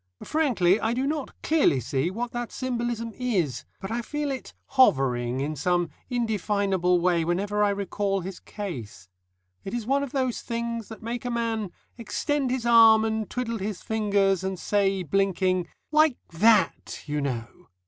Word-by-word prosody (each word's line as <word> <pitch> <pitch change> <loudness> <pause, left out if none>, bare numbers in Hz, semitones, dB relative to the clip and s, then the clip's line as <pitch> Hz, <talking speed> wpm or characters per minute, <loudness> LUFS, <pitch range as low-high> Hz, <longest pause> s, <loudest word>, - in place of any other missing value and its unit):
Frankly, 225 - +2
I 225 +2 0
do 260 +2 0
not 295 -1 -3
clearly 305 - +3
see 135 +6 -1
what 235 +5 -4
that 240 -1 -4
symbolism 240 -3 -3
is, 190 - -1
but 195 - -6
I 235 +1 -1
feel 295 +4 -3
it 265 - -6
hovering 130 - +3
in 150 +2 -2
some 175 +3 0 0.2
indefinable 200 -6 +1
way 170 -1 +2
whenever 200 +5 0
I 205 - +4
recall 200 0 -1
his 185 +1 -7
case. 115 - -7 0.5
It 195 - -4
is 235 -3 -3
one 275 +3 +2
of 280 -3 -4
those 260 -3 -1
things 235 -1 -3
that 220 -1 -10
make 235 +1 -4
a 245 - -3
man 230 -4 -1 0.3
extend 275 +4 -1
his 250 -1 -2
arm 225 -2 +7
and 220 -1 -2
twiddle 230 -3 -3
his 200 -1 -4
fingers, 200 -4 +1
and 190 0 -2
say, 195 0 +1
blinking, 185 +1 +1 0.2
"Like 305 -3 +4
that, 200 +1 +2
you 150 0 -2
know." 130 +4 -5
210 Hz, 160 wpm, -26 LUFS, 180-240 Hz, 0.5 s, arm